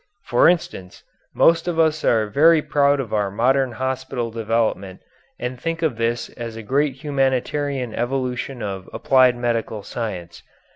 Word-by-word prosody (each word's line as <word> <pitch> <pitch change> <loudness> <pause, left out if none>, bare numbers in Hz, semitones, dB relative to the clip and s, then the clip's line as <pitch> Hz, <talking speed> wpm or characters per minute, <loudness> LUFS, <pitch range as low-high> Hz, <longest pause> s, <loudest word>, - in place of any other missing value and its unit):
For 120 - +4
instance, 95 - -3 0.3
most 165 +1 +4
of 175 -2 -1
us 155 -1 +2
are 110 -2 +3
very 155 +10 +4
proud 145 -1 +2
of 120 -5 -4
our 105 -2 +1
modern 125 +5 +1
hospital 130 -1 -3
development 110 -4 -2 0.4
and 125 0 -5
think 165 0 -3
of 145 -8 0
this 115 0 -1
as 115 -1 -7
a 115 - -8
great 140 +4 0
humanitarian 135 -2 -1
evolution 125 +1 -3
of 95 -2 -5
applied 130 -2 +4
medical 115 -3 -2
science. 95 -9 -6
125 Hz, 145 wpm, -21 LUFS, 115-140 Hz, 0.4 s, For